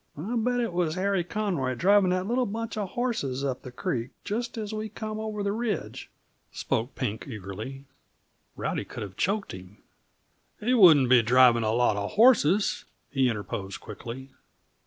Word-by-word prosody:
"I 200 +11 -3
bet 245 +2 +1
it 230 -7 -1
was 170 -3 0
Harry 190 -1 0
Conroy 175 -10 -2
driving 195 +6 +4
that 185 +1 0
little 245 +4 0
bunch 230 +3 -4
uh 210 -2 -2
horses 180 - -2
up 130 -2 -2
the 125 - -9
creek, 120 0 -3
just 235 +3 -3
as 215 -1 -4
we 215 0 -4
come 215 0 -5
over 215 -1 -4
the 200 - 0
ridge," 220 -4 -3 0.4
spoke 115 +5 -2
Pink 115 -3 -3
eagerly. 110 +4 -7 0.7
Rowdy - - -2
could - - -7
have 95 -2 -9
choked 200 +1 -1
him. 95 +2 -11 0.8
"He 240 +4 +1
wouldn't 160 - +7
be 125 -2 +7
driving 120 0 +5
a 110 -1 +1
lot 115 -2 +2
of 100 0 -3
horses," 210 - +4 0.3
he 135 -2 +2
interposed 100 -3 -5
quickly. 120 +5 -9
175 Hz, 165 wpm, -27 LUFS, -, 0.8 s, wouldn't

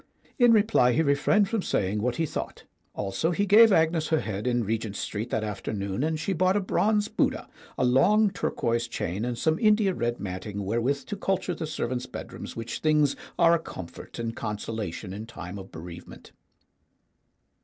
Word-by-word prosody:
In 245 -1 +7
reply 205 - +4
he 160 - +2
refrained 150 +8 +3
from 225 0 -1
saying 105 - -1
what 120 +2 0
he 165 - 0
thought. - - -5 0.3
Also 100 +11 -1
he 190 +4 +1
gave 220 +3 +7
Agnes 160 -2 +3
her 160 -1 +2
head 105 +2 -4
in 120 -1 +1
Regent 110 -1 -2
Street 110 +4 -4
that 110 - -1
afternoon, 100 +1 -3
and 155 0 0
she 175 +6 -1
bought 185 +2 +2
a - - +3
bronze 210 +2 +1
Buddha, - - 0 0.3
a - - +2
long 195 +12 +4
turquoise 120 -11 -1
chain, 100 -2 -3
and 120 -1 -2
some 160 +5 +1
India 210 -3 +4
red 120 -5 -2
matting 100 +2 -5
wherewith 125 +6 0
to 205 - -4
culture 190 -2 -1
the 160 - -4
servants' 125 -4 -3
bedrooms - - -8
which 115 0 -5
things 150 -2 +3 0.2
are 170 -1 +5
a 170 - +3
comfort 85 - -9
and 115 -1 -3
consolation 105 -3 -4
in 105 +3 -7
time 100 -3 -8
of 95 - -11
bereavement. 85 +2 -10
125 Hz, 175 wpm, -27 LUFS, 105-175 Hz, 0.3 s, In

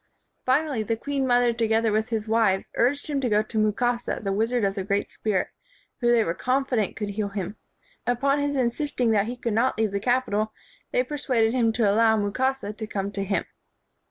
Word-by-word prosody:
Finally, 275 -2 +2
the 225 +1 -1
queen 275 +2 -2
mother 245 -1 +3
together 225 -1 +1
with 215 +2 0
his 220 -2 -2
wives 220 -4 +1
urged 280 +4 +1
him 285 -2 -1
to 250 - 0
go 210 0 +3
to 215 0 -3
Mukasa, 235 +3 0
the 195 -1 -1
wizard 225 +3 0
of 195 - 0
the 195 -1 -3
great 200 +1 -1
spirit, 200 -4 -1 0.5
who 240 -2 +3
they 235 -2 +4
were 165 - -1
confident 255 -2 0
could 210 -1 -4
heal 205 0 -2
him. 200 0 -4 0.5
Upon 275 +4 +2
his 285 0 -1
insist 260 +3 -1
ing 240 -2 +3
that 210 -1 +2
he 245 +1 -5
could 235 -2 -2
not 235 +4 +1
leave 220 -2 +1
the 200 - -1
capital, 220 -3 0 0.4
they - - +2
persuaded 255 - 0
him 235 -3 +3
to 220 -2 +2
allow 220 +2 +4
Mukasa 215 +2 -1
to 220 0 -6
come 200 -2 -3
to 200 -1 -3
him. 195 +1 -1
225 Hz, 205 wpm, -25 LUFS, 210-250 Hz, 0.5 s, they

